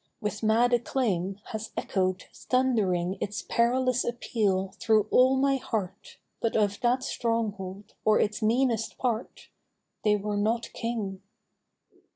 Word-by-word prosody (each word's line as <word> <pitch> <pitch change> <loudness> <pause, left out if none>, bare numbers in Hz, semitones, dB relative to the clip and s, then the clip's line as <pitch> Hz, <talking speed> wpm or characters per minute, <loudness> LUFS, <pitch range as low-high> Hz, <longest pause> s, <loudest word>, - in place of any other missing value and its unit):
With 210 -2 -3
mad 230 +3 +3
acclaim, 205 -6 0
has 220 0 -4
echo'd, 185 -1 -1
thundering 200 -8 0
Its 205 +1 -3
perilous 255 +2 +2
appeal 200 -5 -1
through 220 -2 +3
all 260 +1 +5
my 275 +1 +2
heart, 205 -6 -5 0.2
But 230 - -1
of 205 -2 +1
that 250 +2 +2
stronghold, 210 -6 -3
or 215 0 +4
its 210 +2 0
meanest 230 0 +1
part, 240 -3 -3 0.5
They 210 -1 +4
were 205 0 -2
not 230 +3 0
King. 215 -5 -3
220 Hz, 125 wpm, -28 LUFS, 200-240 Hz, 0.5 s, all